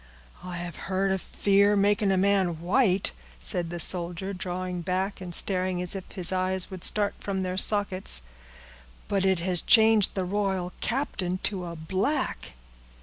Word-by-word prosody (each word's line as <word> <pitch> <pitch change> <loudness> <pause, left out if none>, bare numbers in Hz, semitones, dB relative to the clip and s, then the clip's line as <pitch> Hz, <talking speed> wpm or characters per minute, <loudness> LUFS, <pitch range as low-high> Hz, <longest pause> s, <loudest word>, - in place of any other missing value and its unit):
"I 180 -1 -6
have 175 0 -6
heard 195 0 0
of 190 -1 -1
fear 200 +1 +2
making 205 0 +2
a 190 - +2
man 190 -4 +1
white," 190 +2 +2 0.3
said 170 - 0
the 175 0 -5
soldier, 175 +3 -1
drawing 180 -1 -4
back, 190 +3 -2
and 180 - -6
staring 185 -2 +1
as 180 +2 -1
if 190 - -8
his 180 -3 +1
eyes 185 0 0
would 185 -2 -8
start 205 -1 +3
from 195 -1 -3
their 185 0 -3
sockets, 190 - +2 0.8
"but 195 -1 0
it 190 -3 +1
has 180 -1 0
changed 220 -3 +5
the 190 -2 -1
royal 190 -2 -2
captain 195 -8 -2
to 190 -3 -2
a 170 -1 -6
black!" 190 - -2
190 Hz, 160 wpm, -26 LUFS, 180-200 Hz, 0.8 s, changed